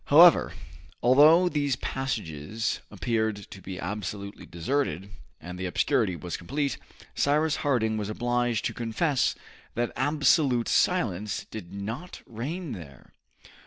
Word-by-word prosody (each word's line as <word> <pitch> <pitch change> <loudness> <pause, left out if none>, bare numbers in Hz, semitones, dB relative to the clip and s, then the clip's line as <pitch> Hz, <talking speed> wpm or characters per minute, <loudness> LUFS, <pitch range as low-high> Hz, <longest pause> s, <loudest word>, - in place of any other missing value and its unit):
However, 165 +3 +7 0.5
although 150 +8 +7
these 145 -5 0
passages 110 - -3
appeared 110 +3 -1 0.2
to 95 - -10
be 95 0 -7
absolutely 100 +1 -5
deserted, 95 - -2 0.3
and 90 +2 -8
the 95 - -2
obscurity 90 +1 +1
was 85 +2 -5
complete, 140 - -2 0.3
Cyrus 150 +2 +2
Harding 110 -6 +1
was 105 -1 -3
obliged 120 0 0
to - - -1
confess 125 +5 0 0.4
that 120 +1 0
absolute 140 -2 +2
silence 105 - +1
did 90 -5 -8
not 110 - -6
reign 145 +8 -5
there. 70 -9 -10
115 Hz, 120 wpm, -27 LUFS, 100-145 Hz, 0.5 s, However